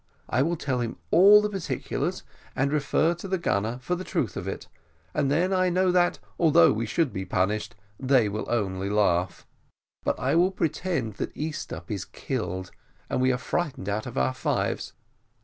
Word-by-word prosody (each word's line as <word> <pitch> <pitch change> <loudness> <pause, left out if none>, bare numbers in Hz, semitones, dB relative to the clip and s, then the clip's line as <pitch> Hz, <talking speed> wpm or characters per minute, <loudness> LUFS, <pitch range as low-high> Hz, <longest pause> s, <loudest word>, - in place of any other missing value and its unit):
I 125 - +1
will 165 +5 +1
tell 135 -5 -2
him 115 -1 -3
all 205 +5 +8
the 210 - 0
particulars, 195 -4 -3 0.3
and 140 +2 +1
refer 150 +3 +2
to 175 +3 -8
the 190 0 0
gunner 115 - -1
for 180 - -1
the 180 +1 -2
truth - - -2
of - - -5
it; - - -5 0.5
and 135 - +1
then 175 +7 +2
I 185 -1 +3
know 185 +1 +2
that, 180 -1 +3 0.2
although 155 - +6
we 110 +1 -2
should 155 +3 0
be 95 - -3
punished, 105 +4 -1 0.2
they 130 -4 +3
will 105 +2 -4
only 100 -4 -1
laugh; 90 -4 +1 0.6
but - - -1
I 130 +3 +1
will 175 +3 +4
pretend 165 - -2
that - - -4
Easthupp 145 - -5
is 100 -3 -2
killed, 95 -8 -4 0.4
and - - +1
we 130 0 +4
are 125 - 0
frightened 130 - -3
out 105 +2 -2
of - - -7
our 65 0 +2
lives. - - -1
130 Hz, 185 wpm, -26 LUFS, 105-175 Hz, 0.6 s, all